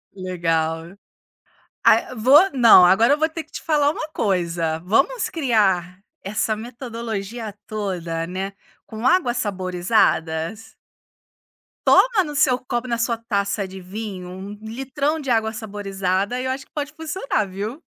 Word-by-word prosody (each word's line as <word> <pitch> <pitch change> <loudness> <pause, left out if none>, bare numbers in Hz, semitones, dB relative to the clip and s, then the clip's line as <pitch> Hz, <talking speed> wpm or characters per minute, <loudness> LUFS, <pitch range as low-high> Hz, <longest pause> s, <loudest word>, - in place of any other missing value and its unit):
Legal. 165 -1 -2 0.9
Ai - - +4
vou 285 - +6
não, 230 -8 +8
agora 225 +9 +5
eu - - +1
vou 315 +1 +1
ter 320 0 -6
que 310 - -32
te - - -7
falar 295 -2 +2
uma 310 - -5
coisa, 170 - -1
vamos 270 - +1
criar 195 - +1 0.2
essa 215 +2 -1
metodologia 230 -2 -6
toda, 175 -6 -3
né, 190 +2 -4 0.3
com 225 +3 -3
águas 250 -6 +2
saborizadas? 185 -1 0 1.1
Toma 455 -6 +5
no 295 -1 -6
seu 255 -3 +3
copo, 245 -1 -3
na 235 -1 -1
sua 230 0 0
taça 200 -3 -1
de 190 0 -9
vinho 185 -1 -7
um 190 +2 -8
litrão 270 +7 -2
de 275 -3 -6
água 220 -2 +1
saborizada 200 0 -2
e 255 - -3
eu 260 - 0
acho 265 0 -5
que - - -37
pode 295 0 -4
funcionar, 315 - -2
viu? 215 - -5
220 Hz, 145 wpm, -22 LUFS, 185-260 Hz, 1.1 s, não